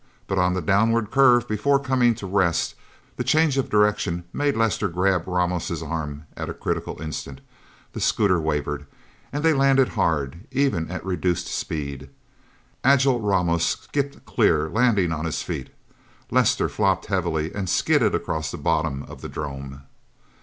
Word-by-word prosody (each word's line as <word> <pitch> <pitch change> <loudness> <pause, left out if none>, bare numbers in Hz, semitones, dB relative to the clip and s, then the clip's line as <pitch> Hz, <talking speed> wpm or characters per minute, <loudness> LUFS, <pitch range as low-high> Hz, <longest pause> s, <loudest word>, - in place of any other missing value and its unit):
But 95 -1 -1
on 90 0 +2
the 95 - -2
downward 110 +4 +2
curve 125 -3 +5
before 110 +7 +2
coming 130 -4 +2
to 105 - -8
rest, 95 -3 +1 0.4
the - - -1
change 155 -3 +3
of 130 - -1
direction 105 -5 +1
made 145 -2 0
Lester 110 -2 +1
grab 90 0 0
Ramos' 90 -2 -1
arm 75 -2 -4
at - - -5
a - - -5
critical - - -3
instant. 75 -3 -6 0.5
The - - -5
scooter 95 -5 +2
wavered, 75 -2 -2 0.4
and 145 +2 -3
they 160 - +5
landed 135 -2 +4
hard, 80 - -1
even 130 -12 0
at 90 0 -6
reduced 90 -2 -1
speed. 70 -5 -4 0.7
Agile 135 -1 +4
Ramos 90 -5 +1
skipped 140 -1 -2
clear, 75 +1 +2
landing 105 -6 +2
on 80 0 -3
his 80 - -2
feet. - - -5 0.6
Lester - - +3
flopped - - 0
heavily, 80 0 -1
and 95 -3 -3
skidded - - +2
across 80 -1 -2
the - - -6
bottom 70 0 0
of - - -11
the - - -6
'drome. 70 -1 -6
95 Hz, 155 wpm, -24 LUFS, 80-120 Hz, 0.7 s, curve